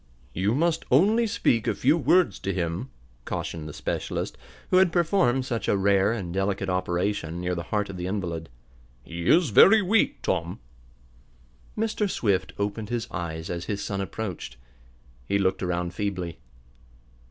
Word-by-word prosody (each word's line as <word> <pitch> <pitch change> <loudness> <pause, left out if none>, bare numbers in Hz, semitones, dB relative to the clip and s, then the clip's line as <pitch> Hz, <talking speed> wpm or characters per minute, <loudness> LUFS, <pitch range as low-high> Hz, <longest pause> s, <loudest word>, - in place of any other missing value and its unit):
"You 100 +6 +1
must 165 +2 +1
only 210 - +4
speak 115 - +1
a - - +1
few 140 +5 +3
words 175 +1 +3
to 95 - -2
him," 85 -6 -2 0.3
cautioned 80 +4 -4
the - - -6
specialist, - - -3 0.4
who 185 - +5
had 185 -2 +5
performed 165 -7 +2
such 120 -3 -3
a 100 - +3
rare 100 +1 +3
and 95 -7 -4
delicate 95 0 -1
operation, 90 -1 -1
near 90 0 -1
the 85 - -2
heart 105 -1 0
of 95 - -7
the 90 0 -4
invalid. 85 -5 -3 0.5
"He 85 +4 -6
is 165 -7 +4
very 210 - +7
weak, 205 +3 +1
Tom." 85 -1 -1 1.2
Mr. 215 -1 0
Swift 100 - 0
opened 105 +1 -3
his 120 -2 -2
eyes 80 -2 -4
as 85 -1 -4
his 100 -1 -3
son 100 -1 -3
approached. 95 - -5 0.7
He 100 - +2
looked 95 -1 0
around 90 -1 -2
feebly. 90 -4 -3
100 Hz, 155 wpm, -26 LUFS, 90-130 Hz, 1.2 s, very